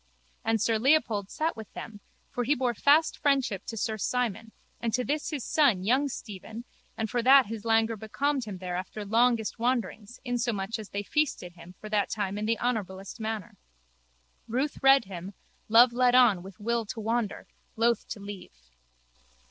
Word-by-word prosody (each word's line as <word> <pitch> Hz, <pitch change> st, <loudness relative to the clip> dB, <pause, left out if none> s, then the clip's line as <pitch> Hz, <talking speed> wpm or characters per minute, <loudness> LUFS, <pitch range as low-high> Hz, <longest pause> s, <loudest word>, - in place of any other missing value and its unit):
And 225 Hz, 0 st, +1 dB
sir 225 Hz, +1 st, +1 dB
Leopold 225 Hz, -7 st, +2 dB
sat 320 Hz, +2 st, -1 dB
with 220 Hz, -2 st, -10 dB
them 210 Hz, -2 st, -8 dB, 0.3 s
for 245 Hz, -, -2 dB
he 285 Hz, +5 st, +2 dB
bore 250 Hz, -2 st, 0 dB
fast 290 Hz, +7 st, +3 dB
friendship 270 Hz, -, +1 dB
to 225 Hz, -, -5 dB
sir 220 Hz, +1 st, -2 dB
Simon 230 Hz, -1 st, -2 dB, 0.3 s
and 230 Hz, -1 st, -1 dB
to 250 Hz, -, 0 dB
this 295 Hz, +4 st, -2 dB
his 290 Hz, -6 st, -4 dB
son 255 Hz, -12 st, +3 dB
young 260 Hz, +8 st, +2 dB
Stephen 220 Hz, 0 st, -8 dB, 0.3 s
and 220 Hz, -, -1 dB
for 240 Hz, +3 st, -1 dB
that 265 Hz, +2 st, +7 dB
his 220 Hz, +1 st, -7 dB
languor 225 Hz, 0 st, +2 dB
becalmed 265 Hz, +5 st, -2 dB
him 205 Hz, -3 st, -6 dB
there 180 Hz, -1 st, -5 dB
after 190 Hz, +3 st, -5 dB
longest 230 Hz, +1 st, +2 dB
wanderings 230 Hz, -2 st, -2 dB
insomuch 235 Hz, -3 st, -2 dB
as 215 Hz, -, -8 dB
they 200 Hz, 0 st, -3 dB
feasted 250 Hz, -, -1 dB
him 175 Hz, +1 st, -14 dB
for 215 Hz, -, -8 dB
that 210 Hz, -1 st, 0 dB
time 200 Hz, -1 st, -2 dB
in 215 Hz, -, -2 dB
the 230 Hz, 0 st, +1 dB
honourablest 195 Hz, -6 st, -3 dB
manner. 220 Hz, -3 st, -5 dB, 0.9 s
Ruth 260 Hz, +6 st, -2 dB
red 270 Hz, -2 st, +6 dB
him, 190 Hz, 0 st, -8 dB, 0.3 s
love 235 Hz, +2 st, +7 dB
led 250 Hz, 0 st, +3 dB
on 235 Hz, -8 st, +5 dB
with 190 Hz, +1 st, -12 dB
will 235 Hz, +2 st, 0 dB
to 225 Hz, -, -6 dB
wander, 225 Hz, -1 st, -2 dB, 0.3 s
loth 230 Hz, 0 st, +1 dB
to -, -, -6 dB
leave. 180 Hz, -, -11 dB
225 Hz, 175 wpm, -28 LUFS, 205-250 Hz, 0.9 s, that